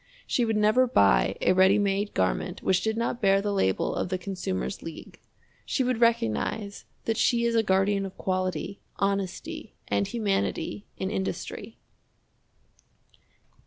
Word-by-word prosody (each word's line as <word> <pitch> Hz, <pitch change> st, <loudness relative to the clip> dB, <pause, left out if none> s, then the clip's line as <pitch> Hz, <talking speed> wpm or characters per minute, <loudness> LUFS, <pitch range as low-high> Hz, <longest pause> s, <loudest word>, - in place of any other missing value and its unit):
She 245 Hz, -, +1 dB
would 225 Hz, -1 st, 0 dB
never 215 Hz, +5 st, +4 dB
buy 80 Hz, -, +3 dB
a -, -, +4 dB
ready 190 Hz, +2 st, +5 dB
made 200 Hz, 0 st, 0 dB
garment 95 Hz, -, -1 dB
which 185 Hz, -1 st, +2 dB
did 220 Hz, +1 st, -1 dB
not 235 Hz, +1 st, -2 dB
bear 195 Hz, -1 st, +4 dB
the 205 Hz, 0 st, -1 dB
label 95 Hz, -, +1 dB
of -, -, -2 dB
the 185 Hz, -, -1 dB
Consumer's 190 Hz, +1 st, -4 dB
League. 165 Hz, -1 st, -9 dB, 0.4 s
She 265 Hz, -, 0 dB
would 250 Hz, -2 st, -1 dB
recognize 205 Hz, -, 0 dB, 0.2 s
that 225 Hz, -1 st, 0 dB
she 235 Hz, -1 st, +2 dB
is 235 Hz, -, +1 dB
a 225 Hz, -, +4 dB
guardian 195 Hz, 0 st, +2 dB
of 190 Hz, -, -13 dB
quality, 185 Hz, +1 st, -2 dB, 0.2 s
honesty, 195 Hz, -2 st, -3 dB
and 100 Hz, 0 st, +1 dB
humanity 205 Hz, -2 st, -2 dB
in 190 Hz, +1 st, -3 dB
industry. 195 Hz, +2 st, -4 dB
195 Hz, 145 wpm, -27 LUFS, 185-220 Hz, 0.4 s, ready